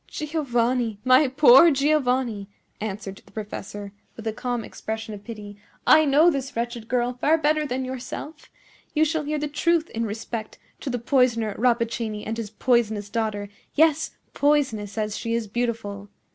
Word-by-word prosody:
"Giovanni! 245 -7 -1
my 255 +3 +6
poor 265 +4 +7
Giovanni!" 260 -8 +1 0.3
answered 200 -2 -5
the - - -21
professor, 205 -1 -7 0.2
with 225 - -10
a 220 - -1
calm 245 0 -3
expression 220 0 -6
of 205 -1 -9
pity, 210 -3 -9 0.3
"I 310 0 +7
know 300 +5 +5
this 270 -3 -4
wretched 235 -1 -3
girl 245 0 0
far 295 +6 +2
better 305 -1 +1
than 260 0 -2
yourself. 260 +4 -7 0.5
You 310 +1 +4
shall 315 -1 -1
hear 305 +1 -1
the 300 0 -2
truth 330 +3 +1
in 230 0 -2
respect 220 +1 -5 0.2
to - - -5
the 245 - -1
poisoner 235 -3 +2
Rappaccini 230 -3 0
and 220 - -3
his 225 -2 -5
poisonous 220 -3 0
daughter; 215 -3 -2 0.3
yes, 315 0 +3 0.2
poisonous 245 -9 +1
as 210 -1 -1
she 230 0 -2
is 230 -1 -1
beautiful. 205 -3 -3
240 Hz, 160 wpm, -24 LUFS, 220-280 Hz, 0.5 s, poor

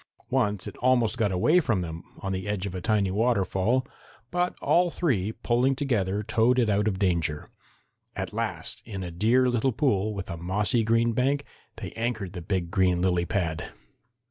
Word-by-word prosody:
Once 105 -2 +1
it - - -7
almost 120 -3 +2
got 110 -5 +1
away 150 - +4
from 110 - 0
them, 85 -1 -5 0.2
on 95 - -3
the 95 +1 -3
edge 105 -2 -2
of 95 - -4
a 90 - -4
tiny 105 -2 +1
waterfall, 110 +2 +1 0.5
but 180 0 0
all 175 +1 +3
three 120 - 0
pulling 120 +4 +1
together 105 -8 0
towed 115 +4 +2
it 115 -4 +3
out 105 +1 +1
of 100 -3 0
danger. 85 -6 -1 0.6
At - - -4
last, - - -3
in 100 -4 -6
a 90 - -5
dear 115 +9 +3
little 125 +2 +1
pool 110 -5 0
with 95 -1 -5
a 85 - -5
mossy 100 +6 0
green 115 +1 +2
bank, 140 +4 +1 0.3
they 105 -5 -7
anchored 110 -5 -3
the 90 - -6
big 85 -1 -2
green 90 -2 +2
lily 90 -2 +2
pad. 85 -3 -2
105 Hz, 180 wpm, -27 LUFS, 95-120 Hz, 0.6 s, away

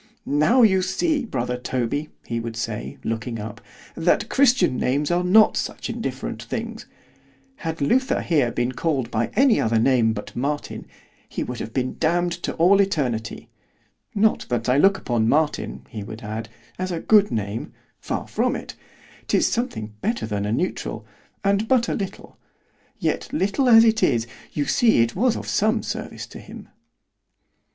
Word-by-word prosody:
—Now 155 - +4
you 190 -4 +5
see, 275 - 0
brother 125 - -2
Toby, 130 +4 -2 0.2
he 115 - -2
would 115 0 -5
say, 115 -1 -4
looking 115 +1 -3
up, 110 +2 -7 0.3
"that 165 +1 +1
christian 255 - +3
names 145 +5 0
are 175 +1 +2
not 210 +4 +5
such - - -3
indifferent - - -4
things;"——had 165 - -8
Luther 255 - +2
here 145 -8 +2
been 120 +1 -1
called 130 -4 -1
by 115 +1 0
any 265 -4 +4
other 115 0 +1
name 115 -1 +3
but 105 - -8
Martin, 145 +4 -3 0.4
he - - -3
would 125 -1 -6
have 110 - -5
been 130 +2 -2
damn'd 175 +2 +1
to - - -3
all 180 +4 +5
eternity——Not 155 - -2
that 120 -1 -1
I 125 +3 +3
look 195 +4 +5
upon 115 -9 0
Martin, 155 +2 0
he 110 - -7
would 110 +2 -8
add, 110 +1 -5 0.3
as 185 0 -2
a 170 - -2
good 205 +2 +4
name——far 105 0 -5
from - - 0
it——'tis - - -4
something 170 - -3
better 230 - -1
than 105 -2 -2
a - - -1
neutral, 170 +11 -2 0.4
and 200 +2 +1
but 240 -2 +3
a - - -1
little——yet 195 -3 -6
little 255 0 +1
as 225 -1 +9
it 225 0 +3
is 115 -1 +2 0.3
you 145 - -1
see 230 - +4
it 115 - -3
was 235 +5 +2
of - - -6
some 220 +2 +1
service - - -5
to - - -11
him. - - -12
150 Hz, 155 wpm, -23 LUFS, -, 0.4 s, as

